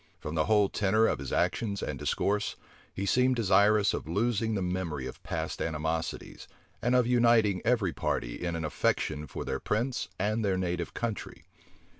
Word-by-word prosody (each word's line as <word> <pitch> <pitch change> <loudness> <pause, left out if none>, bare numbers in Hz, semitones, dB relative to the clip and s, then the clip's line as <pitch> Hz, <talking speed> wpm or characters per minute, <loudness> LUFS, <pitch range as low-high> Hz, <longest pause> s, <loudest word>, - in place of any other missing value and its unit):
From 75 - -6
the 80 -1 +1
whole 105 -2 +4
tenor 110 +3 +2
of - - +1
his 70 - -6
actions 100 +3 0
and - - -4
discourse, 105 +1 0 0.4
he 100 - -4
seemed 125 +4 +3
desirous 105 -2 +4
of - - -4
losing 110 +4 0
the 100 - -1
memory 90 -7 -2
of 65 - -8
past - - -4
animosities, 80 +1 -3 0.3
and 120 +1 +2
of 125 -1 +4
uniting 115 -6 +4
every 110 -7 +2
party - - -2
in 85 -1 -1
an 80 -1 -3
affection 75 0 -1
for - - -6
their - - -2
prince 120 +4 -1
and 105 +3 0
their 95 -2 +1
native 90 -2 -2
country. 115 -3 -4
100 Hz, 170 wpm, -29 LUFS, 85-110 Hz, 0.4 s, whole